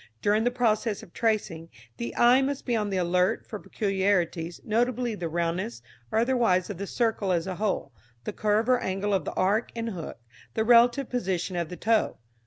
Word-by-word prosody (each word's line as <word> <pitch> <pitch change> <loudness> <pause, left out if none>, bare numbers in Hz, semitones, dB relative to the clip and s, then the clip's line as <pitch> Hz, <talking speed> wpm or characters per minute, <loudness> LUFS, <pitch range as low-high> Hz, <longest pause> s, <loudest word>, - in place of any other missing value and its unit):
During 210 +2 +2
the - - +4
process 230 -3 0
of 170 - -15
tracing, 200 -8 -1 0.3
the 115 -1 -5
eye 245 +2 +6
must 275 0 -2
be 240 - 0
on 210 -2 0
the 195 - -1
alert 180 +4 +1
for 210 - -7
peculiarities, 190 -5 -1
notably 240 +2 0
the 175 -5 -4
roundness 165 -7 -2 0.3
or - - 0
otherwise 230 -6 +2
of 190 - -8
the 200 - -4
circle 220 -4 0
as 170 -1 +1
a 185 -2 -4
whole, 205 - -2 0.3
the - - -4
curve 215 +2 +1
or 255 -1 +4
angle 195 +1 -2
of 195 - 0
the - - -4
arc 205 +5 +1
and 230 0 -3
hook, 170 -5 -7 0.4
the 220 - +1
relative 240 +3 +5
position 185 -6 -2
of 170 -2 -2
the 180 - -7
toe. 225 0 +1
205 Hz, 195 wpm, -27 LUFS, 180-230 Hz, 0.4 s, eye